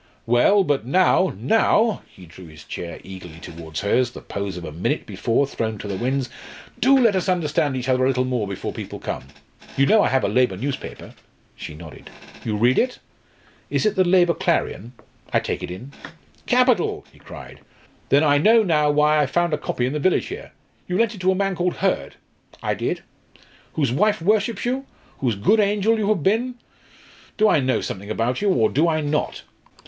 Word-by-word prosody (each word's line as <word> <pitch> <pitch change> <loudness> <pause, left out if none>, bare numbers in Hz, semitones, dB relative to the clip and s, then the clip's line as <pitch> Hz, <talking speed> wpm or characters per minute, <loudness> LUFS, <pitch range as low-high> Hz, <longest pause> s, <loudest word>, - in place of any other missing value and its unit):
Well, 120 - +4
but 145 - 0
now 185 +6 +3
now" 220 - +2
he 90 - -15
drew 85 +1 -13
his 75 -1 -13
chair 85 -1 -7
eagerly 90 -4 -10
towards 80 -2 -7
hers, 120 +4 +2
the - - -10
pose 100 -2 -5
of 85 - -7
a - - -6
minute 80 +4 -2
before 115 +5 0
thrown 110 -5 -3
to 105 - -7
the 100 - -3
winds 130 +4 -1 0.5
"do 270 +3 +5
let 230 -6 +4
us 185 0 0
understand 155 -5 0
each 130 0 -4
other 130 0 +2
a - - +3
little 130 -1 +1
more 125 -5 -1
before 100 -1 -5
people - - -7
come. - - -5 0.5
You 135 - +4
know 215 +7 +5
I - - +2
have 130 0 +1
a - - +2
labour 125 -7 +1
newspaper?" 135 +6 -6 0.4
She 75 - -8
nodded. 80 0 -12 0.3
"You 105 -2 -2
read 120 +4 +3
it?" 250 0 0 0.7
"Is - - 0
it 215 -1 +2
the 190 - +4
Labour 175 -1 +4
Clarion? 115 - -1 0.4
I - - +3
take - - -4
it - - -5
in." 115 +10 -8 0.6
"Capital!" 250 -6 +2
he - - -20
cried. - - -11 0.5
"Then 145 +2 +4
I 145 -1 +4
know 220 +7 +5
now 150 -6 +2
why 150 +1 +3
I 145 - +2
found 175 +1 0
a - - +2
copy 125 - -2
in 130 - -2
the 150 - -2
village 185 +5 +1
here. 420 +5 -8 0.4
You 180 - -1
lent 230 0 +2
it 200 - -10
to 185 +1 +3
a - - 0
man 195 0 0
called 175 0 -1
Hurd?" - - -1 0.5
"I - - 0
did." - - -3 0.7
"Whose 140 -6 0
wife 210 - +2
worships 210 +5 +1
you? 265 +2 -2 0.3
whose 120 -5 0
good 165 - +3
angel 210 +2 +2
you 205 -1 0
have 200 -8 +1
been? 235 +6 +1 0.8
Do 215 - +4
I 160 - +4
know 130 -1 0
something 100 +1 -6
about 115 - -1
you, 205 - +2
or 115 - +3
do 155 +9 +1
I 155 -1 +1
not? 150 0 -2
145 Hz, 200 wpm, -22 LUFS, -, 0.8 s, do